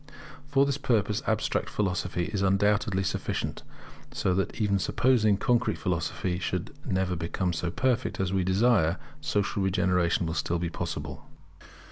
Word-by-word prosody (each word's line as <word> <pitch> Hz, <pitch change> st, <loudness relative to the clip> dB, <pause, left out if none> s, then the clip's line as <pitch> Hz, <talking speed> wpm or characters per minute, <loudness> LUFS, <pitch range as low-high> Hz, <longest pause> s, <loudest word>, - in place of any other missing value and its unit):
For 140 Hz, -1 st, +3 dB
this 140 Hz, 0 st, -1 dB
purpose 110 Hz, -6 st, +1 dB
Abstract -, -, 0 dB
philosophy 90 Hz, -3 st, -1 dB
is 100 Hz, -, 0 dB
undoubtedly 100 Hz, 0 st, +2 dB
sufficient; 95 Hz, -, -2 dB, 0.5 s
so 95 Hz, -, 0 dB
that 95 Hz, +5 st, -1 dB
even 100 Hz, -2 st, +2 dB
supposing 115 Hz, -1 st, +3 dB
that 100 Hz, -, -6 dB
Concrete 125 Hz, -1 st, +2 dB
philosophy 90 Hz, 0 st, -2 dB
should -, -, -3 dB
never 95 Hz, -1 st, 0 dB
become 90 Hz, +2 st, -2 dB
so 85 Hz, +1 st, -2 dB
perfect 130 Hz, +6 st, 0 dB
as 95 Hz, -1 st, 0 dB
we 95 Hz, -1 st, +2 dB
desire, 95 Hz, -2 st, +3 dB, 0.2 s
social 100 Hz, 0 st, -1 dB
regeneration 90 Hz, -2 st, +2 dB
will 80 Hz, -, -2 dB
still 85 Hz, +2 st, -1 dB
be 85 Hz, 0 st, -3 dB
possible. -, -, -5 dB
95 Hz, 145 wpm, -28 LUFS, 90-105 Hz, 0.5 s, For